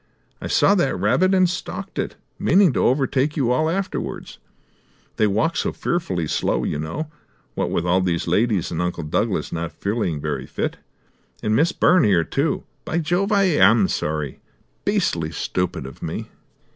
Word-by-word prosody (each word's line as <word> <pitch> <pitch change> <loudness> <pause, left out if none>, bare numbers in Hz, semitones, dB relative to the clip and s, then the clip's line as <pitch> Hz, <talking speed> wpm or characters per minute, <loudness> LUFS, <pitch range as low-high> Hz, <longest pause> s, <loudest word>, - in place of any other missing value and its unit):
I - - -4
saw 200 - +4
that 175 - +1
rabbit 170 - +3
and 185 -1 +5
stalked 175 0 -5
it, - - -3 0.2
meaning 190 -6 +4
to - - +1
overtake 135 +3 +1
you 125 -4 +2
all 155 +6 +2
afterwards. 190 +3 -4 0.8
They 110 - +3
walk 110 +12 +1
so - - 0
fearfully 95 - -2
slow, - - 0
you 75 - -2
know, 150 - -4 0.4
what - - -1
with 85 - -1
all 90 +1 +3
these 90 -2 0
ladies, 100 +1 +1
and 85 0 -2
Uncle 90 -1 -2
Douglas 75 - -1
not 85 0 -3
feeling 100 -7 -2
very 70 -3 -3
fit. - - -3 0.7
And 110 0 +1
Miss 160 +8 +3
Byrne 185 0 +4
here, 90 -5 +4
too! 140 - -1 0.2
By 160 - -2
Jove, 175 +5 0
I 200 -1 +4
am 110 - +5
sorry! 75 -3 -3 0.5
Beastly 80 -2 0
stupid 90 -3 -2
of 65 - -10
me." - - -5
110 Hz, 165 wpm, -22 LUFS, -, 0.8 s, and